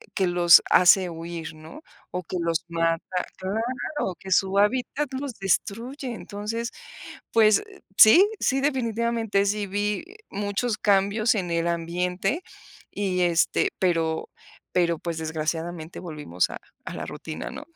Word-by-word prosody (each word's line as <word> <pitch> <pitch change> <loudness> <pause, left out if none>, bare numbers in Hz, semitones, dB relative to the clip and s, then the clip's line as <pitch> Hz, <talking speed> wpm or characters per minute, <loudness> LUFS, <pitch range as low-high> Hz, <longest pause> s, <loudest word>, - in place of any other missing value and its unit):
que 190 - +2
los 175 -1 +7
hace 180 +1 +6
huir, 165 0 -6
¿no?, 160 - -12 0.3
o 180 0 -3
que 180 - -4
los 165 -1 -1
mata. 165 0 +1 0.4
Claro, 225 +2 -3
que 190 - -9
su 190 +1 +2
hábitat 255 +7 +1
los 265 0 -4
destruye. 235 +7 -2
Entonces, 220 +3 -5 0.6
pues, 215 -2 +5
eh, 415 -2 -15 0.2
sí, 335 - +9
sí, 270 0 +1
definitivamente 235 -6 0
sí 205 0 0
vi, 205 +6 -2
eh, 395 +3 -15
muchos 205 +3 -2
cambios 205 +3 +2
en 180 -4 -2
el 170 0 0
ambiente 180 - -1 0.5
y 190 -3 -1
este, 175 -1 +2
pero 165 -3 0 0.4
pero 170 -2 +2
pues, 170 0 -4
desgraciadamente 160 +1 -4
volvimos 150 - -2
a - - -7 0.3
a - - -5
la - - -5
rutina, - - -7
¿no? - - -8
195 Hz, 140 wpm, -25 LUFS, 170-230 Hz, 0.6 s, sí